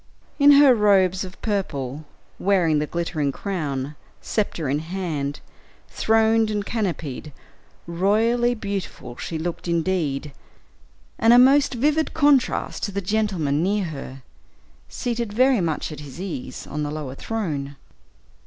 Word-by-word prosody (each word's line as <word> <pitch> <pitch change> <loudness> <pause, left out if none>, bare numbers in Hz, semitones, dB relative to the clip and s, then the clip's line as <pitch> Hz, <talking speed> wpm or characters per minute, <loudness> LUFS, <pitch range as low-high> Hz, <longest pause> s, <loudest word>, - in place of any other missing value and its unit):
In 290 0 +8
her 280 -2 +7
robes 195 -4 +3
of 185 0 -10
purple, 150 - -3 0.3
wearing 175 -6 +2
the 150 - -2
glittering 160 -4 -2
crown, 145 -6 -4 0.2
sceptre 190 -8 -2
in 140 +3 0
hand, 160 -4 -4 0.5
throned 225 0 +2
and 210 -1 -2
canopied, 165 - -3 0.5
royally 225 +8 +2
beautiful 200 - -5
she 165 - -4
looked 170 +2 -4
indeed, 165 -4 -1 0.9
and 225 +1 +6
a - - +8
most 270 +1 +5
vivid 300 +5 +1
contrast 290 -4 +2
to 205 - -5
the 200 - -2
gentleman 185 -8 0
near 200 +3 +1
her, 135 -4 -8 0.7
seated 235 -3 -3
very 255 -1 +4
much 160 -2 -2
at 150 - -8
his 145 +1 -10
ease, 180 -9 -6
on 150 - -5
the 150 - -2
lower 150 -3 -5
throne. 145 -7 -4
185 Hz, 130 wpm, -23 LUFS, 150-220 Hz, 0.9 s, In